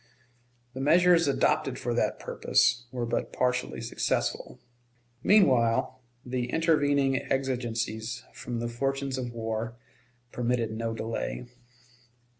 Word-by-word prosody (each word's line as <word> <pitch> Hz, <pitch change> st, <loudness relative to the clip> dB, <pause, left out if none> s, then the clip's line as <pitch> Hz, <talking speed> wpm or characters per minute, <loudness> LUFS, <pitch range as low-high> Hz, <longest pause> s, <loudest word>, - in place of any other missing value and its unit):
The 130 Hz, -, -5 dB
measures 170 Hz, +2 st, +5 dB
adopted 140 Hz, -, +1 dB
for -, -, -2 dB
that -, -, 0 dB
purpose 120 Hz, 0 st, +1 dB
were 125 Hz, -2 st, -2 dB
but 115 Hz, -, -2 dB
partially 125 Hz, -, -1 dB
successful. -, -, -2 dB, 0.6 s
Meanwhile 130 Hz, -, +3 dB, 0.2 s
the 125 Hz, -1 st, -2 dB
intervening 145 Hz, -4 st, +2 dB
exigencies 120 Hz, -3 st, -2 dB
from 120 Hz, -1 st, -5 dB
the 120 Hz, +1 st, -2 dB
fortunes 135 Hz, +2 st, -2 dB
of 125 Hz, -2 st, -4 dB
war 115 Hz, 0 st, -3 dB, 0.6 s
permitted 120 Hz, -2 st, 0 dB
no 115 Hz, +1 st, -3 dB
delay. 115 Hz, +2 st, -4 dB
125 Hz, 105 wpm, -28 LUFS, 115-135 Hz, 0.6 s, measures